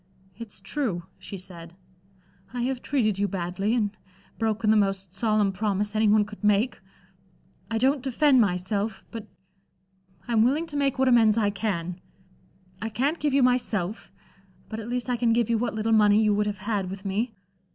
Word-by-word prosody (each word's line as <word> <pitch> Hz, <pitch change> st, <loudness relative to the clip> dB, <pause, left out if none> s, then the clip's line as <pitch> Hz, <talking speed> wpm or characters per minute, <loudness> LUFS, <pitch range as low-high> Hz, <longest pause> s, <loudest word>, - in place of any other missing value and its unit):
"It's 215 Hz, -3 st, -9 dB
true," 195 Hz, -4 st, -2 dB, 0.2 s
she 200 Hz, -, -7 dB
said. 175 Hz, -2 st, -10 dB, 0.8 s
"I 245 Hz, -, -1 dB
have 255 Hz, 0 st, -2 dB
treated 215 Hz, -8 st, 0 dB
you 205 Hz, -, +2 dB
badly, 195 Hz, +4 st, -1 dB
and 210 Hz, -3 st, 0 dB, 0.4 s
broken 220 Hz, -1 st, +1 dB
the -, -, +5 dB
most 195 Hz, -3 st, 0 dB
solemn 215 Hz, -1 st, +1 dB
promise 205 Hz, +1 st, -1 dB
any 215 Hz, 0 st, +3 dB
one 210 Hz, 0 st, +4 dB
could 210 Hz, 0 st, -12 dB
make. 210 Hz, +4 st, +2 dB, 0.9 s
I 225 Hz, -, -1 dB
don't 265 Hz, +4 st, +2 dB
defend 265 Hz, 0 st, +4 dB
myself; 200 Hz, +2 st, -1 dB
but 225 Hz, -2 st, -7 dB, 1.0 s
I'm 225 Hz, -2 st, +3 dB
willing 285 Hz, +7 st, +2 dB
to 315 Hz, -3 st, -9 dB
make 280 Hz, -2 st, +1 dB
what 265 Hz, 0 st, +2 dB
amends 230 Hz, -3 st, +5 dB
I 205 Hz, -2 st, +2 dB
can. 180 Hz, -4 st, -3 dB, 0.8 s
I 220 Hz, -, -2 dB
can't 275 Hz, +9 st, 0 dB
give 290 Hz, -2 st, 0 dB
you 275 Hz, -, +4 dB
myself, 225 Hz, -6 st, 0 dB, 0.6 s
but 220 Hz, -, -5 dB
at 225 Hz, +1 st, -7 dB
least 245 Hz, 0 st, -2 dB
I 250 Hz, -1 st, 0 dB
can 230 Hz, -1 st, +2 dB
give 235 Hz, -1 st, +1 dB
you 230 Hz, -, +2 dB
what 230 Hz, -2 st, -2 dB
little 220 Hz, +1 st, -1 dB
money 210 Hz, -1 st, +5 dB
you 210 Hz, -1 st, +3 dB
would 210 Hz, +1 st, +1 dB
have 205 Hz, -1 st, -3 dB
had 205 Hz, -4 st, -1 dB
with 195 Hz, +1 st, -8 dB
me. 215 Hz, +4 st, -2 dB
215 Hz, 180 wpm, -26 LUFS, 200-240 Hz, 1.0 s, the